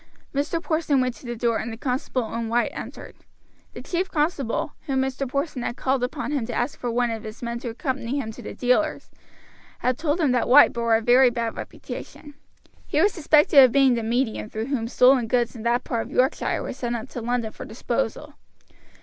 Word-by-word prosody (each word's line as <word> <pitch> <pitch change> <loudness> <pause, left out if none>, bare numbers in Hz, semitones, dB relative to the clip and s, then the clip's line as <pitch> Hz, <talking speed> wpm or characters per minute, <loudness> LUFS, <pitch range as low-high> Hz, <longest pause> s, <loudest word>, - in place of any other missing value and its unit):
Mr. 290 +4 -1
Porson 315 -4 +1
went 255 -1 0
to 245 - -13
the 240 - -3
door, 230 -1 +1
and 230 - -4
the 225 - -7
constable 250 -1 -2
and 230 -1 -3
White 240 +1 +1
entered. - - -8 0.6
The - - -8
chief 365 +1 -2
constable, 295 -4 -1
when 270 -2 0
Mr. 265 +1 -1
Porson 280 -1 -2
had 240 - -4
called 260 -1 0
upon 250 +3 -3
him 285 -5 0
to 240 - -4
ask 245 +5 -2
for 245 - -3
one 240 0 +1
of 225 -1 -4
his 215 +2 -9
men 235 0 -3
to 235 - -5
accompany 260 +1 -3
him 220 -5 -4
to - - -11
the - - -8
dealer's, 260 +5 0 0.7
had 250 0 -1
told 310 +1 0
him 300 -6 +2
that 250 -1 +1
White 290 +4 +7
bore 235 -1 +2
a 225 - +1
very 250 +3 +6
bad 235 -1 -3
reputation. 295 -1 -8 0.5
He 300 - 0
was 405 +5 +4
suspected 300 -3 +6
of 255 - +5
being 270 -1 +4
the 235 - -1
medium 225 -1 -1
through 220 0 -4
whom 230 -4 -1
stolen 250 0 +4
goods 240 +1 0
in 230 - -8
that 235 +2 +1
part 230 -2 -2
of - - -13
Yorkshire 260 +2 +1
were - - -4
sent 240 -2 -3
up 230 +1 -5
to 245 - -6
London 235 -1 -1
for - - -9
disposal. - - -3
250 Hz, 215 wpm, -24 LUFS, 235-275 Hz, 0.7 s, White